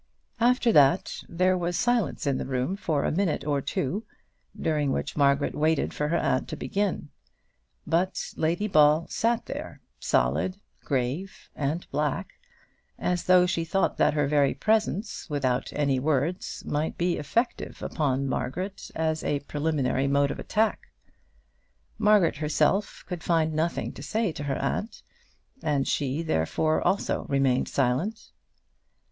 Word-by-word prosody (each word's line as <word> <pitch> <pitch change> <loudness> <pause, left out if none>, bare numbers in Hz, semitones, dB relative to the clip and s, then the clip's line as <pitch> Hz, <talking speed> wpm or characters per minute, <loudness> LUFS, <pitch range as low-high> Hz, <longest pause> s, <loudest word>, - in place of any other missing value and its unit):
After 240 0 +3
that 150 +3 +4
there 185 +2 +2
was 175 -1 -1
silence 240 -9 +1
in 140 -2 +1
the - - -3
room 130 +7 -1
for 155 -8 -1
a - - +1
minute 165 -5 0
or 145 -2 0
two, 180 +11 -2 0.6
during 150 -3 0
which 150 - -2
Margaret 140 -1 +2
waited 155 0 +1
for 150 - -1
her 170 +3 +1
aunt 130 - 0
to - - -5
begin; 195 -7 -2 0.8
but 175 +4 -1
Lady 170 +6 0
Ball 155 -2 +5
sat 230 0 0
there - - -7 0.2
solid, 70 - +1 0.3
grave, 140 +8 -3
and 150 +4 -2
black, 150 -1 -1 0.7
as 180 -1 -1
though 180 -1 +6
she 175 -2 0
thought 195 +4 0
that - - +3
her 145 -1 +2
very 140 -1 +2
presence, 215 -3 0
without 135 -3 -1
any 140 -3 +1
words, 150 +5 -1
might 150 +2 -2
be 175 0 +1
effective 230 - -2
upon 140 -3 0
Margaret 175 +11 -3
as 160 -1 -1
a 145 -1 0
preliminary 145 -2 0
mode 140 0 +2
of - - -6
attack. 220 +1 0 1.1
Margaret 210 -7 +4
herself 155 +6 0
could 180 -3 -5
find 160 -2 +1
nothing 160 +2 -1
to - - -10
say 220 -4 -1
to 145 -2 -6
her 135 -1 -1
aunt, 220 - -3 0.6
and 145 -3 0
she, 145 +3 -1
therefore, 155 - +1
also 190 +3 0
remained 135 -2 +1
silent. 140 - -1
155 Hz, 140 wpm, -27 LUFS, 140-185 Hz, 1.1 s, though